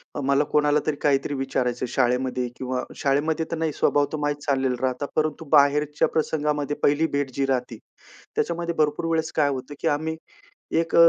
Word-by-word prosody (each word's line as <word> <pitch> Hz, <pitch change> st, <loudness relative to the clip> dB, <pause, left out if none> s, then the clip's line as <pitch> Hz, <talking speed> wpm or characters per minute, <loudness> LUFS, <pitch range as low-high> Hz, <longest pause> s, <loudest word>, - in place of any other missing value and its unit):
अ, -, -, -2 dB
मला 140 Hz, +2 st, +3 dB
कोणाला 150 Hz, 0 st, +4 dB
तरी 155 Hz, -, +1 dB
काहीतरी 140 Hz, -1 st, +1 dB
विचारायचंय 130 Hz, -2 st, -1 dB
शाळेमध्ये 125 Hz, 0 st, +1 dB
किंवा 130 Hz, 0 st, -3 dB
शाळेमध्ये 150 Hz, +3 st, 0 dB
तर 165 Hz, -, -1 dB
नाही. 160 Hz, -1 st, 0 dB
स्वभाव 145 Hz, +1 st, +2 dB
तो 155 Hz, -, -2 dB
माहीत 145 Hz, 0 st, 0 dB
झालेला 130 Hz, -2 st, +1 dB
राहता. 130 Hz, +2 st, 0 dB
परंतु, 155 Hz, +1 st, 0 dB
बाहेरच्या 150 Hz, 0 st, +4 dB
प्रसंगामध्ये 150 Hz, -2 st, 0 dB
पहिली 150 Hz, +3 st, +3 dB
भेट 140 Hz, -2 st, -1 dB
जी 140 Hz, -, +1 dB
राहते, 125 Hz, -3 st, -1 dB, 0.6 s
त्याच्यामध्ये 170 Hz, 0 st, -1 dB
भरपूर 150 Hz, +1 st, +1 dB
वेळेस 160 Hz, -1 st, 0 dB
काय 145 Hz, -2 st, +3 dB
होतं, 130 Hz, 0 st, -4 dB
की -, -, 0 dB
आम्ही 160 Hz, +1 st, -3 dB, 0.6 s
एक 165 Hz, 0 st, -1 dB
अ, 170 Hz, 0 st, +9 dB
145 Hz, 175 wpm, -24 LUFS, 135-155 Hz, 0.6 s, अ